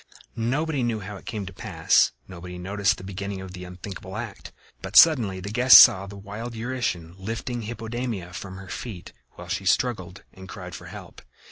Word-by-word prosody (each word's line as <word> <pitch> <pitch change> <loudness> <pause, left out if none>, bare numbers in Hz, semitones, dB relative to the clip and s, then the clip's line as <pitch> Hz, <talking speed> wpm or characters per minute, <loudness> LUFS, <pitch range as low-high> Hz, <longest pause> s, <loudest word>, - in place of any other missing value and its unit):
Nobody 140 +5 -1
knew 115 -3 -1
how 100 +2 -7
it - - -16
came 105 -4 -4
to 95 - -9
pass; - - +2 0.2
nobody 90 -1 -9
noticed 100 +2 0
the - - -11
beginning 100 +1 -5
of 95 -1 -9
the 90 -1 -8
unthinkable 95 +2 -8
act; 115 -3 -7 0.3
but - - -7
suddenly 115 - +6
the 100 +3 -6
guests 125 +3 +9
saw 95 +1 +7
the 100 0 -10
wild 105 +4 -7
Eurytion 115 -8 -3
lifting 115 +4 -4
Hippodamia 115 -4 -5
from 95 +1 -7
her 95 0 -10
feet, 95 -4 -7 0.2
while 90 - -11
she 95 +1 -3
struggled 95 -5 0
and 95 0 -12
cried 90 -4 -8
for - - -9
help. - - -11
100 Hz, 180 wpm, -25 LUFS, 95-115 Hz, 0.3 s, guests